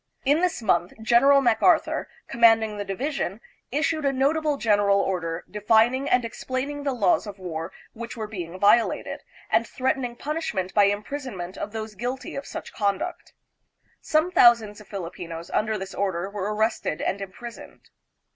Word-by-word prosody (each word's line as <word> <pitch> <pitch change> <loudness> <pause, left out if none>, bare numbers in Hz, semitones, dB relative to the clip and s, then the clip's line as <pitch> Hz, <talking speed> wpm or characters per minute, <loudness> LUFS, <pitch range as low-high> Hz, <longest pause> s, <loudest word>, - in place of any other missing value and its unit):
In 290 +4 +4
this 360 -9 0
month 175 -4 +1
General 275 +5 +5
MacArthur, 270 +8 +2 0.2
com 235 - -8
manding 225 -2 +5
the 205 - -2
division, 205 - -3 0.3
issued 310 +3 0
a 275 - +2
notable 290 +3 +1
general 205 -4 +3
order, 175 -4 -2
defining 225 +6 +2
and 250 -1 +3
explaining 260 +5 -4
the 280 -1 -1
laws 265 +2 +2
of 205 -1 -7
war 165 -2 -5 0.2
which 235 +1 -7
were 220 - -3
being 185 -4 -7
violated, 210 +4 +2 0.3
and - - +3
threatening 255 -2 -1
punishment 240 - -3
by 205 -2 +5
impris 215 +8 -3
onment 185 -5 -6
of 205 - -5
those 220 0 -5
guilty 245 +6 -5
of 275 0 -5
such - - -7
conduct. 200 -2 -2 0.7
Some 315 +3 +1
thousands 230 - +5
of 210 - -16
Filipinos 170 -3 -7
under 215 0 0
this 190 0 -7
order 190 -1 -2
were 205 0 -3
arrested 220 -6 -1
and 200 - -1
impris 215 +5 -8
oned. - - -16
220 Hz, 160 wpm, -25 LUFS, 200-265 Hz, 0.7 s, General